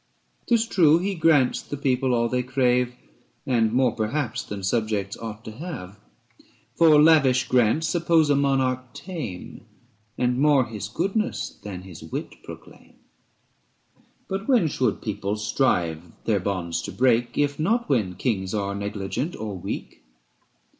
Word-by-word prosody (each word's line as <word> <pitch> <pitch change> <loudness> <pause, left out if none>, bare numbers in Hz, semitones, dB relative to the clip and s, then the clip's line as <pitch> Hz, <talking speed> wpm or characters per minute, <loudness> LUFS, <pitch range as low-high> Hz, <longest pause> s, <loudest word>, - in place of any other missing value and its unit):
'Tis 235 -2 +3
true 165 -8 +4
he 195 +3 -1
grants 155 -7 +3
the 145 - -7
people 130 -2 +1
all 115 0 +2
they 125 +1 0
crave, 125 -1 +1 0.5
And 115 -4 +2
more 125 0 +3
perhaps 120 +4 -2
than 100 -2 -7
subjects 105 -1 -1
ought 110 0 -8
to - - -6
have: 110 - -8 0.8
For 160 -3 +6
lavish 150 -5 +5
grants 125 +6 +2
suppose 165 -3 +3
a - - +4
monarch 130 -2 0
tame 155 - -7 0.5
385 125 - -1
And 125 0 +1
more 145 -3 +4
his 105 -4 -6
goodness 195 - -2
than 95 -3 -7
his 90 -4 -11
wit 80 - -6
proclaim. - - -13 1.3
But 195 +2 -4
when 240 -11 +4
should 125 -6 -1
people 100 -1 -2
strive 90 - 0
their 105 -3 +2
bonds 90 -3 -2
to - - -6
break, 120 -1 +1
If 145 0 0
not 230 +9 +1
when 105 -10 0
kings 95 -3 -2
are 100 -1 -1
negligent 100 - -3
or 105 -2 -5
weak 90 - -6
125 Hz, 145 wpm, -24 LUFS, 105-150 Hz, 1.3 s, For